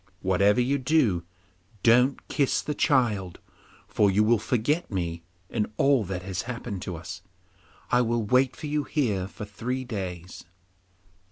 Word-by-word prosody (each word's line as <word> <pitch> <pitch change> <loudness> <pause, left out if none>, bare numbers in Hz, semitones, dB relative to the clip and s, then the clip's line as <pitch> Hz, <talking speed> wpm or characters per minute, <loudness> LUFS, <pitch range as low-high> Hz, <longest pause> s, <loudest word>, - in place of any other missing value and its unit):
Whatever 100 +4 +3
you 135 +3 +1
do, 125 - +2 0.6
don't 125 +4 +4
kiss 140 -3 +1
the 150 - -2
child, 115 - +1 0.6
or 105 - +4
you 100 +2 +3
will 115 +1 +3
forget 140 - 0
me 85 -4 -3 0.3
and 105 -2 -1
all 135 -4 +4
that 90 -1 -4
has 95 -1 -3
happened 115 -6 -5
to 90 - -5
us. 80 - -8 0.7
I 125 - +4
will 120 -1 0
wait 130 +4 +2
for 160 - -8
you 150 0 -1
here 110 -11 -1
for 105 +2 -8
three 125 +6 -4
days. 95 -5 -6
115 Hz, 150 wpm, -26 LUFS, 95-130 Hz, 0.7 s, don't